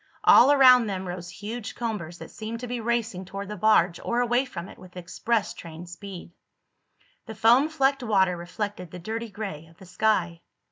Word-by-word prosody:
All 265 +4 +7
around 255 -4 +7
them 190 -2 -4
rose 175 0 -6
huge 215 +5 -7
combers 205 -8 -4
that - - -11
seemed 225 +2 -6
to 250 - -5
be 245 0 -3
racing 230 -5 -1
toward 195 +2 -7
the 210 - -5
barge 185 -4 +3
or 235 - -1
away 245 +2 +2
from 185 -8 -7
it - - -14
with 180 0 -14
express 200 +5 -2
train 165 0 -10
speed. 175 0 -10 1.0
The 220 - -7
foam 240 +8 +4
flecked 275 -3 +1
water 190 -6 +2
reflected 180 +1 -5
the 180 - -9
dirty 225 +6 -5
gray 195 -7 -7
of 165 0 -21
the 190 - -14
sky. 180 -3 0
205 Hz, 185 wpm, -26 LUFS, 180-235 Hz, 1.0 s, All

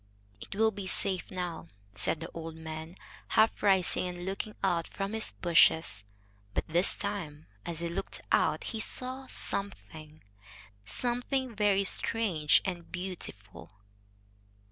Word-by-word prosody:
"It - - -7
will 220 +1 +4
be 200 -2 -6
safe 185 0 0
now," 175 -3 -4 0.3
said 105 +11 +1
the 165 - -6
old 165 -1 -6
man, 160 +1 -7 0.3
half 220 0 +3
rising 190 -3 +3
and 175 0 -6
looking 195 +2 -4
out 175 -4 +1
from 195 +1 -4
his 220 0 +4
bushes. 160 - +4 0.5
But - - -1
this 170 +3 +4
time, 170 -8 -4 0.2
as 170 -1 -3
he 170 - -1
looked 190 +4 -3
out, - - +3
he 225 - -4
saw 255 +4 -2
something, 155 - -4 0.6
something 245 - 0
very 205 -2 +3
strange 190 -8 +2
and 175 -3 -4
beautiful. 105 - -3
180 Hz, 130 wpm, -30 LUFS, 160-205 Hz, 0.6 s, will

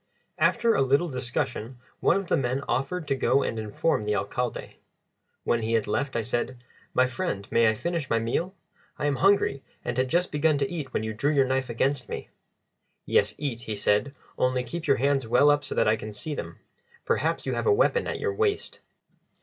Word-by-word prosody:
After 230 -1 +3
a - - +2
little 140 +6 +2
discussion 125 -1 -3 0.2
one - - +3
of 195 - -3
the - - +1
men 130 +1 -1
offered 150 +6 -1
to 140 - +2
go 135 0 +2
and 115 - -2
inform 110 +5 0
the 105 0 0
Alcalde. 120 +5 -3 0.7
When 120 - +1
he 110 +1 -1
had 115 -2 +2
left, 135 +5 -1
I 115 - 0
said, 120 +2 -2 0.4
"My 130 - +5
friend, 105 -5 -3
may 115 -1 +5
I 110 - 0
finish 165 +3 -3
my 115 - +2
meal? 160 - -1 0.4
I 150 - -2
am 145 -2 +1
hungry, 195 -8 +3 0.2
and 120 - -2
had 130 0 +1
just 175 +4 +1
begun 150 0 +2
to 140 -1 -1
eat 155 -6 -5
when - - -1
you 110 0 -3
drew 140 +7 0
your 140 -3 +4
knife 130 0 -1
against 130 +2 0
me." - - -6 0.8
"Yes; - - +2
eat," 135 -6 -3
he 110 - -1
said; 105 +7 +1 0.2
"only 130 0 +2
keep 155 +7 -6
your 140 - +4
hands 135 -1 +1
well 125 +6 +5
up 145 0 +1
so - - -5
that - - +3
I 110 - +4
can 110 0 -7
see 125 +9 -4
them. - - -6 0.5
Perhaps - - 0
you - - -1
have - - -1
a - - +6
weapon 475 +2 +3
at - - -3
your 435 -2 -1
waist." 415 0 -1
135 Hz, 210 wpm, -26 LUFS, 115-150 Hz, 0.8 s, a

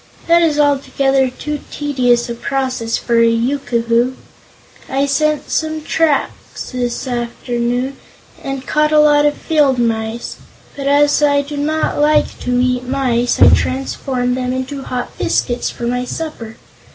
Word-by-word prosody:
"That 340 0 +4
is 310 -3 +2
altogether 275 -2 +2
too 295 +4 -5
tedious 250 -5 +1
a 235 - -4
process 255 -2 -2
for 235 -1 +1
a 230 - +5
Yookoohoo. 235 0 0 0.7
I 275 +1 +1
set 305 +1 0
some 315 -1 -1
traps 310 -2 -1
this 245 0 -3
afternoon 245 +1 -2 0.5
and 270 -1 -5
caught 300 0 +1
a 305 - +4
lot 295 -1 +5
of 290 - -1
field 290 -5 +2
mice, 230 0 -2 0.4
but 275 -1 -4
as 290 +1 +3
I 285 -1 +3
do 290 +1 -7
not 305 +2 -1
like 300 +1 +2
to 250 0 -1
eat 250 0 +1
mice, 250 -3 0
I - - +8
transformed 255 -1 0
them 255 0 -2
into 260 +2 -4
hot 250 -2 -5
biscuits 240 -1 0
for - - -9
my 250 +1 -1
supper. 250 -7 -6
265 Hz, 145 wpm, -17 LUFS, 245-290 Hz, 0.7 s, I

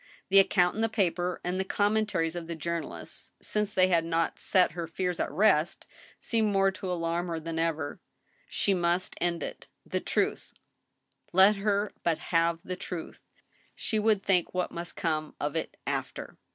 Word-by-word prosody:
The 195 +1 +7
account 180 -2 +4
in 220 - -3
the 225 - +2
paper 180 -4 0
and 180 +1 -1
the - - +2
commentaries 205 -5 +1
of 170 -2 -5
the 170 - -4
journalist, 170 +1 -5
since 210 -1 -1
they 185 -1 +4
had 170 -2 +3
not 165 0 0
set 185 -2 +3
her 170 0 -4
fears 180 +1 -2
at - - 0
rest, 165 -1 +2 0.3
seemed 220 -3 +1
more 195 -1 +3
to 190 -1 -5
alarm 170 0 -1
her 165 -1 -2
than 165 0 -4
ever. 160 -3 -1 0.5
She 200 - +1
must 175 0 0
end 170 -3 0
it. - - -7 0.2
The - - -1
truth— - - -1 0.8
let 195 +3 +7
her 205 0 0
but 165 -2 +1 0.2
have 165 0 +3
the 185 - -4
truth! 175 -2 -7 0.5
She 220 - -1
would 210 -2 +2
think 185 -3 +1
what 180 - 0
must 170 0 -6
come 155 -2 -2
of 145 +2 -2
it 160 - -3
after. - - -4
180 Hz, 175 wpm, -29 LUFS, 165-195 Hz, 0.8 s, The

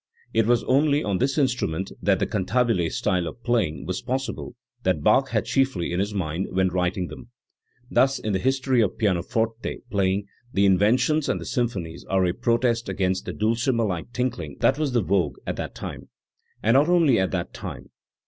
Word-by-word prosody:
It 115 -1 +3
was 120 -1 +3
only 145 +2 +3
on 100 -2 -1
this 135 +3 0
instrument 120 - 0
that 95 -1 +3
the - - 0
"cantabile 105 -3 +1
style" 90 -4 0
of 120 - -9
playing 115 -10 0
was 90 - -3
possible 130 0 -4 0.3
that 90 -8 0
Bach - - +4
had - - 0
chiefly 130 -11 0
in 90 - 0
his 100 +2 0
mind 90 -2 -2
when 95 0 +1
writing 90 +1 -1
them. 120 -2 -11 0.6
Thus 135 +1 +3
in 105 - -3
the 95 - +1
history 130 +1 +2
of 105 - 0
pianoforte 110 +3 -1
playing 100 0 +1 0.3
the 100 - +3
Inventions 120 +10 +3
and - - -1
symphonies 105 - -2
are 95 -1 +2
a 90 - +1
protest 115 +1 +1
against 95 -1 -1
the - - -4
dulcimer 115 +2 +1
like 90 +2 -3
tinkling 120 - -3
that 135 - +3
was 145 -4 0
the 120 -3 +2
vogue 85 -6 0
at - - -2
that - - -5
time - - -7 0.5
and 115 - +4
not 145 +5 +4
only 165 -9 +4
at 95 - +1
that 90 -2 -3
time. - - -8
110 Hz, 185 wpm, -24 LUFS, 95-125 Hz, 0.6 s, Bach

